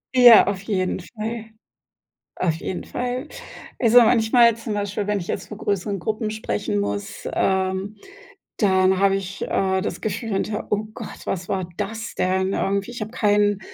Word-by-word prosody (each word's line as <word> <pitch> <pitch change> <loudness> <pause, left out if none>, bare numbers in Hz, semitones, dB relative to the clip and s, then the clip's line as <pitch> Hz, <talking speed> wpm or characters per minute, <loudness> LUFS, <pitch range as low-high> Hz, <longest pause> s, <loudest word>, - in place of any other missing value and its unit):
Ja, 245 -3 +9
auf 195 -1 -2
jeden 190 -3 -1
Fall. 220 +3 -6 0.9
Auf 170 -3 0
jeden 180 +2 -5
Fall. 250 +4 -4 0.5
Also, 235 0 +6
manchmal 230 0 +4
zum 225 -2 -4
Beispiel, 205 0 -2
wenn 210 0 0
ich 170 - -7
jetzt 185 0 -4
vor 210 - -8
größeren 200 -1 -1
Gruppen 215 +3 -2
sprechen 105 - -2
muss, 100 0 -4
ähm, 190 +2 0 0.6
dann 190 -2 +3
habe 195 0 +4
ich, 195 0 -5
äh, 190 -1 0
das - - -4
Gefühl 220 +2 -3
hinterher: 210 +2 -2
„Oh 210 +1 0
Gott, - - -9
was 180 -2 -3
war 185 -2 -1
das 220 +3 -4
denn?“ 190 +1 0
Irgendwie 200 +3 -1
ich 240 - -7
hab 215 0 -4
keinen 205 -3 +2
205 Hz, 160 wpm, -22 LUFS, 190-220 Hz, 0.9 s, Ja